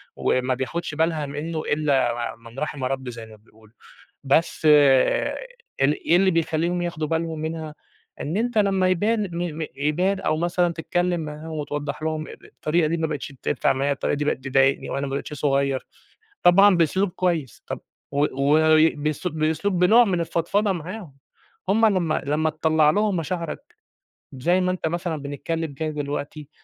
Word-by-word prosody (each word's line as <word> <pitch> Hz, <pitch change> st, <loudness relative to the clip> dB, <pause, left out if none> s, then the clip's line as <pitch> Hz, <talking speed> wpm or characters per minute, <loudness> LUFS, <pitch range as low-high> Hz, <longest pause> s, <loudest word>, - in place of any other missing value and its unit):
وما 130 Hz, 0 st, +1 dB
بياخدش 145 Hz, +4 st, -4 dB
بالها 160 Hz, -1 st, 0 dB
منه 155 Hz, +3 st, -4 dB
إلّا 140 Hz, -5 st, +1 dB, 0.2 s
م 115 Hz, -, -25 dB
من 115 Hz, +3 st, -10 dB
رَحِم 150 Hz, -3 st, -4 dB
ربي 130 Hz, -1 st, -3 dB
زي 115 Hz, -1 st, -9 dB
ما 110 Hz, -1 st, -14 dB
بيقولوا. 110 Hz, 0 st, -23 dB, 0.5 s
بس 155 Hz, +3 st, +1 dB
آآ، 140 Hz, -3 st, +4 dB, 0.4 s
ال 145 Hz, +2 st, +4 dB
إيه 170 Hz, -, +5 dB
اللي 190 Hz, +1 st, +4 dB
بيخلّيهم 165 Hz, +2 st, 0 dB
ياخدوا 165 Hz, -3 st, -3 dB
بالهم 165 Hz, -1 st, -2 dB
منها؟ 160 Hz, -1 st, -5 dB, 0.5 s
إن 160 Hz, +6 st, -3 dB
أنت 235 Hz, 0 st, 0 dB
لمّا 195 Hz, -2 st, +3 dB
يبان 210 Hz, +5 st, +1 dB
م 170 Hz, -2 st, -3 dB
م -, -, -2 dB
يبان 175 Hz, +8 st, 0 dB
أو 155 Hz, -, 0 dB
مثلًا 175 Hz, +1 st, +1 dB
تتكلم 175 Hz, +1 st, -1 dB
معاهم، 155 Hz, +1 st, -7 dB
وتوضَّح 150 Hz, 0 st, -4 dB
لهم 155 Hz, 0 st, -2 dB, 0.2 s
الطريقة 155 Hz, +1 st, 0 dB
دي 170 Hz, -, 0 dB
ما 160 Hz, -, 0 dB
بقِتش 150 Hz, -2 st, -5 dB
تنفع 140 Hz, -, +1 dB
معايا، 140 Hz, +2 st, 0 dB
الطريقة 140 Hz, -, -1 dB
دي 145 Hz, -, -2 dB
بقِت 135 Hz, -3 st, -1 dB
تضايقني، 135 Hz, +1 st, +2 dB
وأنا 140 Hz, +1 st, -2 dB
ما -, -, -6 dB
بقيتش 140 Hz, -, -5 dB
صغير، 140 Hz, -1 st, 0 dB, 0.6 s
طبعًا 195 Hz, +2 st, +6 dB
بأسلوب 180 Hz, +4 st, +2 dB
كويس، 165 Hz, -, -2 dB
طَب -, -, -4 dB, 0.3 s
و 145 Hz, +1 st, +2 dB
وبأسل 155 Hz, +3 st, +2 dB
بأسلوب 160 Hz, +5 st, 0 dB
بنوع 220 Hz, +7 st, +6 dB
من 180 Hz, -5 st, 0 dB
الفضفضة 195 Hz, +5 st, 0 dB
معاهم. 180 Hz, -1 st, -7 dB, 0.5 s
هم 220 Hz, +3 st, +4 dB
لمّا، 180 Hz, -6 st, +1 dB
لمّا 155 Hz, +2 st, +1 dB
تطلَّع 155 Hz, -1 st, +3 dB
لهم 205 Hz, +2 st, +1 dB
مشاعرك، 170 Hz, -, -5 dB, 0.6 s
زي 175 Hz, +8 st, +1 dB
ما 180 Hz, 0 st, +1 dB
أنت 185 Hz, -3 st, -2 dB
مثلًا 170 Hz, -1 st, -2 dB
بنتكلم 145 Hz, +2 st, -4 dB
كده 155 Hz, +3 st, -3 dB
دلوقتي، 145 Hz, 0 st, -5 dB
155 Hz, 160 wpm, -23 LUFS, 145-175 Hz, 0.6 s, طبعًا